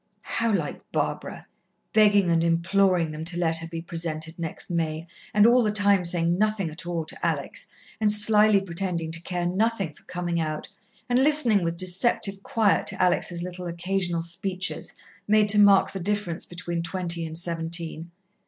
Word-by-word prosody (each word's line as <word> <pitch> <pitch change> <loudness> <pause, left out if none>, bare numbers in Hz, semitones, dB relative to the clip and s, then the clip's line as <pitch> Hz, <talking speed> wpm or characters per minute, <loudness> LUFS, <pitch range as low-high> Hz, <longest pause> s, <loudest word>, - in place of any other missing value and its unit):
How 230 -1 0
like 165 -8 -2
Barbara! - - -3 0.5
Begging 205 -4 +4
and 165 0 +2
imploring 170 0 +2
them 155 +1 -6
to 175 +1 -1
let 165 -2 +2
her 165 - -6
be 165 0 -6
presented 165 -1 -3
next 165 +1 -4
May, 160 -1 -2 0.3
and 210 0 +4
all 245 +2 +5
the 215 -3 +1
time 200 -3 +3
saying 170 +1 0
nothing 215 -5 0
at 165 +2 -8
all 170 -2 -2
to - - -8
Alex, - - -3 0.3
and 215 -1 +2
slyly 210 -1 +5
pretending 170 -3 -3
to 165 0 -2
care 175 0 -3
nothing 195 -2 -1
for - - -21
coming 175 -1 -3
out, 155 -1 -3 0.4
and 245 0 +2
listening 265 - +3
with 170 0 -2
deceptive 195 +2 +1
quiet 215 0 +1
to - - -3
Alex' 175 -1 +1
little 180 0 -6
occasional 175 0 -2
speeches 185 +2 -3 0.4
made 210 0 +4
to 210 0 +5
mark 200 -1 +5
the 195 - -5
difference 190 -2 -2
between 175 -1 -4
twenty 170 -1 -2
and 160 0 -5
seventeen. 165 -1 -2
175 Hz, 170 wpm, -25 LUFS, 165-205 Hz, 0.5 s, all